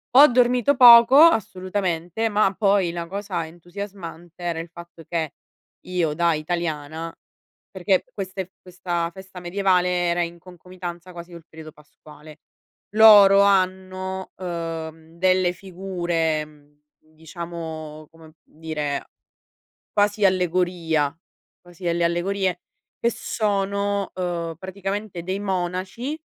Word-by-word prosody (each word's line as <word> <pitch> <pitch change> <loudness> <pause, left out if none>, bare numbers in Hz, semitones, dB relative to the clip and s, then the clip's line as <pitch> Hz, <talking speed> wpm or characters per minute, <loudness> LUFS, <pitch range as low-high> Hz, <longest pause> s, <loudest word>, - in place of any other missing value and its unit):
Ho 285 +3 +10
dormito 250 +2 +3
poco, 240 0 +9
assolutamente, 195 - +2
ma 210 -2 +2
poi 195 -3 +2
la 170 0 -5
cosa 190 -3 -4
entusiasmante 175 -1 -9
era 170 -2 -2
il 165 - -6
fatto 170 -1 -13
che 160 -4 -3 0.5
io 175 -4 -1
da 170 +2 +2
italiana 160 0 -4 0.6
perché 190 0 +1
queste 190 -3 -5
f 190 - -44
questa 175 -2 -3
festa 190 0 -11
medievale 180 0 +1 0.2
era 175 +1 +1
in 170 0 -4
concomitanza 180 0 -10
quasi 170 0 -10
col 170 -2 -12
periodo 160 -1 -11
pasquale. 150 0 -16 0.6
Loro 205 -3 +8
hanno, 190 -1 0
uhm, 165 -2 -6
delle 185 0 +2
figure, 175 -4 -2
mhmm, 150 -1 -22 0.2
diciamo 160 -1 -8
come 160 -1 -17
dire, 150 -3 -4 0.9
quasi 205 0 +1
allegoria, 175 -5 +1 0.5
quasi 175 0 -16
delle 170 0 +1
allegorie 180 +1 -1 0.4
che 235 - +1
sono, 200 -2 -1
uhm, 170 -2 -3
praticamente 195 +1 -5
dei 190 +3 -3
monaci, 190 - -3
180 Hz, 110 wpm, -23 LUFS, 165-195 Hz, 0.9 s, Ho